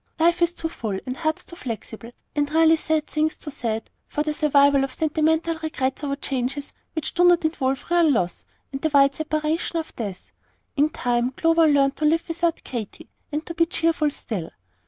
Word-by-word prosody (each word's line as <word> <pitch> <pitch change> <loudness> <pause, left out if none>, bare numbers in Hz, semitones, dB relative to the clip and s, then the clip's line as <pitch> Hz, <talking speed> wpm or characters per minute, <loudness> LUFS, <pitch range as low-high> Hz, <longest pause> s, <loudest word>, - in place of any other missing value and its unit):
Life 340 +2 +3
is 340 0 +4
too 330 - -3
full, 220 -11 -4
and 255 -1 -3
hearts 315 +1 -2
too 345 - -10
flexible, 230 - -7 0.2
and 290 -1 0
really 325 +1 +5
sad 315 -1 0
things 310 +1 -1
too 295 - -6
sad, 225 -5 -2 0.2
for 295 - -1
the 305 0 -1
survival 285 -2 +4
of 270 -1 -4
sentimental 320 +1 +1
regrets 295 -4 -2
over 280 -1 -1
changes 275 0 -3 0.2
which 315 - -3
do 355 - +3
not 350 -2 +5
involve 270 -4 -1
real 345 -2 +5
loss 180 -10 0 0.3
and 270 0 -5
the 315 - +1
wide 275 -1 +5
separation 310 +3 -1
of 320 -1 -5
death. 200 -6 -6 0.4
In 295 +1 +3
time, 245 -4 0
Clover 330 +3 +3
learned 280 -2 +3
to 305 - 0
live 325 +2 +2
without 335 0 -1
Katy, 230 -5 -7 0.2
and 300 +2 -3
to 335 - -6
be 335 0 +2
cheerful 330 -4 +1
still. 195 - -5
305 Hz, 190 wpm, -24 LUFS, 270-325 Hz, 0.4 s, really